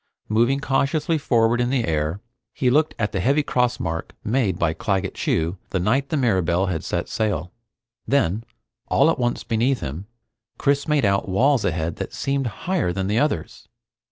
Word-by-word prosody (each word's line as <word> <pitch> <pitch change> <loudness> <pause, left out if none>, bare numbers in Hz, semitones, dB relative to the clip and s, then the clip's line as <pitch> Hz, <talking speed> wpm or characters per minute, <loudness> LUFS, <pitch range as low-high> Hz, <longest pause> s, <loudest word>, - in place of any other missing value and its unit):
Moving 120 +6 +2
cautiously 145 +4 0
forward 120 -3 +2
in 120 - +1
the 130 -3 +1
air, 80 +3 -1 0.3
he 125 -2 +1
looked 155 +3 +2
at 105 -2 -1
the 95 - -2
heavy 140 +10 +2
cross 125 -3 0
mark 80 -1 -4
made 105 -6 +1
by 80 -2 +1
Claggett 95 -1 -1
Chew 85 +3 -1
the 95 - -1
night 125 +10 +1
the 155 - 0
Mirabelle 95 - +2
had 85 -5 -2
set - - -2
sail. 95 -6 -2 0.6
Then, 115 -6 +1 0.4
all - - +4
at - - -3
once 120 -1 -1
beneath 120 +3 +1
him, 75 +8 -5 0.5
Chris 140 +2 +1
made 150 -6 +2
out 100 -1 +1
walls 130 +6 +3
ahead 80 -1 -1
that - - -5
seemed 140 -2 -1 0.2
higher 180 - +1
than 95 +2 -2
the 105 +4 +1
others. 145 - -2
115 Hz, 175 wpm, -23 LUFS, 90-135 Hz, 0.6 s, all